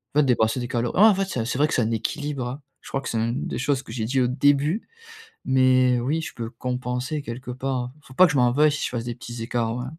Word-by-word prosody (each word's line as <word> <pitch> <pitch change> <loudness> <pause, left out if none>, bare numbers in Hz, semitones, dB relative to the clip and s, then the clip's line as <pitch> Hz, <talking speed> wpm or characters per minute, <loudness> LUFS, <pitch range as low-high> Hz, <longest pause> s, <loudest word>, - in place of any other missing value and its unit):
En 150 - +5
fait - - +3
dépenser 120 -1 +2
des 120 - -4
calor 120 -2 -1
ouais - - +4
en 215 0 +8
fait, 195 0 0
c'est 160 -11 -3
un 110 - -3
c'est 120 - -2
vrai 150 - +3
que - - -4
c'est 125 - +2
un 110 - 0
équilibre, 130 +3 -2
hein. 135 +4 -6 0.2
Je - - -12
crois 135 - -2
que - - -5
c'est 115 - -2
une 115 +3 -1
des - - -4
choses 135 +1 0
que - - -11
j'ai 110 -1 -3
dit 130 +3 +1
au 125 - +3
début. 145 - +2 0.6
Mais 130 -1 +4
oui, 150 +7 -1
je - - -6
peux 115 -1 -5
compenser 125 +3 -3
quelque 125 0 -7
part. 125 -1 -3
Faut 130 -3 -16
pas 185 - +8
que 160 - +1
je 140 - 0
m'en 125 -1 +4
veuille 150 +4 +4
si 145 - -3
je - - -2
fasse 120 -2 -3
des 120 - -3
petits 120 -1 -7
écarts, 115 -1 -1
ouais. 125 +1 -4
125 Hz, 295 wpm, -24 LUFS, 120-140 Hz, 0.6 s, en